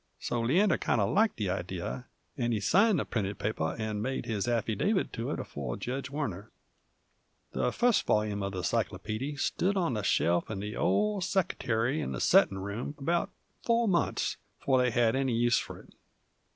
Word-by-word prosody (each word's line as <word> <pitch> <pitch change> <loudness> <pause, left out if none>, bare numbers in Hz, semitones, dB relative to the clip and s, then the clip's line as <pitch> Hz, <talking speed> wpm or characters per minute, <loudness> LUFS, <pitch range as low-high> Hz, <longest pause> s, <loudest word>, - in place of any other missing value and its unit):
So 120 - -2
Leander 175 - +3
kind - - +1
uv - - +1
liked 215 +1 +3
the 100 -5 -1
idee, 95 +4 -4 0.3
and 120 -3 0
he 110 - 0
signed 200 - +4
the - - -1
printed 100 -3 -2
paper 80 -7 -2
'nd 110 -1 -2
made 130 +1 -2
his 110 -3 -2
affidavit 120 - 0
to 115 - -3
it - - -2
afore - - -5
Jedge 130 +2 -4
Warner. 110 - -4 1.0
The - - 0
fust 245 - +2
volyume 105 -1 +1
of 100 0 -3
the 90 -1 -4
cyclopeedy 115 - -2
stood 185 +7 0
on 170 -10 +1
a 105 - -1
shelf 85 -2 +1
in 105 -3 -4
the 105 +2 -5
old 200 - +1
seckertary 135 - 0
in - - -3
the - - -4
settin' 95 - +4
room 100 +9 -4
about 170 +5 0 0.3
four 235 0 +2
months 170 -5 0 0.2
before 130 -2 +2
they 125 0 +3
had 120 -1 +2
any 135 -3 +1
use 120 0 +3
f'r - - -9
it. - - -21
120 Hz, 180 wpm, -30 LUFS, 105-150 Hz, 1.0 s, signed